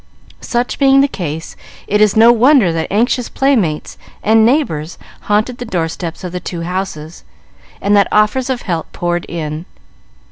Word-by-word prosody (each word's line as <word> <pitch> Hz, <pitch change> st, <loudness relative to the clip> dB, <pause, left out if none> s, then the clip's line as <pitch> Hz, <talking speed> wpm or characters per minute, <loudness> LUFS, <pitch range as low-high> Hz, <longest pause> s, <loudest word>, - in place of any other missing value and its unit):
Such 240 Hz, 0 st, -2 dB
being 275 Hz, -1 st, +5 dB
the 280 Hz, -, +3 dB
case, 160 Hz, -, -6 dB, 0.3 s
it 210 Hz, +1 st, +1 dB
is 210 Hz, -2 st, +4 dB
no 225 Hz, +2 st, +7 dB
wonder 240 Hz, -, +4 dB
that 160 Hz, -1 st, -2 dB
anxious 240 Hz, +3 st, +1 dB
playmates 220 Hz, -, 0 dB, 0.2 s
and 220 Hz, +1 st, +4 dB
neighbors 220 Hz, -, 0 dB, 0.3 s
haunted 215 Hz, +4 st, 0 dB
the -, -, -4 dB
doorsteps 165 Hz, -3 st, -4 dB
of 180 Hz, -, -5 dB
the 180 Hz, -, -4 dB
two 175 Hz, -1 st, -6 dB
houses, 175 Hz, -3 st, -5 dB, 0.6 s
and 200 Hz, +1 st, +2 dB
that 200 Hz, -, +4 dB
offers 215 Hz, +5 st, +2 dB
of 255 Hz, -2 st, -2 dB
help 170 Hz, -4 st, -3 dB
poured 175 Hz, 0 st, -2 dB
in. 160 Hz, 0 st, -5 dB
200 Hz, 155 wpm, -16 LUFS, 170-240 Hz, 0.6 s, no